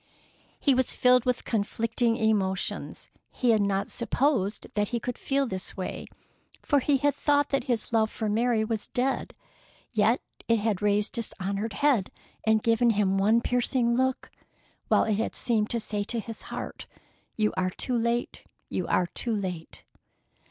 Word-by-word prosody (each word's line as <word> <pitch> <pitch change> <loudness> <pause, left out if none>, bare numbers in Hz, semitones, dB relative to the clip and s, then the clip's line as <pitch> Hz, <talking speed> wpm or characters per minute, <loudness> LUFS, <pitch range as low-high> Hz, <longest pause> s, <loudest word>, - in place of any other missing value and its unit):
He 280 - +3
was 260 -1 +2
filled 250 -1 +4
with 250 0 0
conflicting 230 +2 0
emotions. 200 -5 -1 0.2
He 245 -2 +1
had 220 -2 +3
not 200 -1 0
supposed 235 -4 0
that 210 0 +1
he 235 - -2
could 245 +1 -4
feel 275 +1 0
this 190 -6 -6
way, 185 - -5 0.6
for 285 - +3
he 280 +1 +2
had 290 +1 +2
thought 290 +1 +2
that 275 -2 0
his 240 -3 -1
love 220 -1 +3
for 220 - -3
Mary 225 +1 +2
was 220 -1 -3
dead; 260 +2 -1 0.6
yet - - +3 0.3
it 230 - +4
had 210 -2 -1
raised 205 0 +1
its 230 - 0
dishonored 200 +3 -3
head 240 -3 +2 0.3
and 220 -1 +3
given 230 +1 +3
him 200 -3 +2
one 220 +4 +4
piercing 245 -1 +1
look, 260 +1 0 0.6
while - - +4
it 215 -2 0
had 225 - -2
seemed 220 -4 +1
to 235 - 0
say 210 -1 -2
to 235 +2 -2
his 225 0 -6
heart, - - -6 0.5
"You 215 -1 +1
are 185 0 +1
too 245 +7 -3
late! 235 +1 -1 0.2
You - - -2
are 180 - +2
too 225 +6 -2
late!" 180 -5 -5
225 Hz, 165 wpm, -27 LUFS, 205-245 Hz, 0.6 s, filled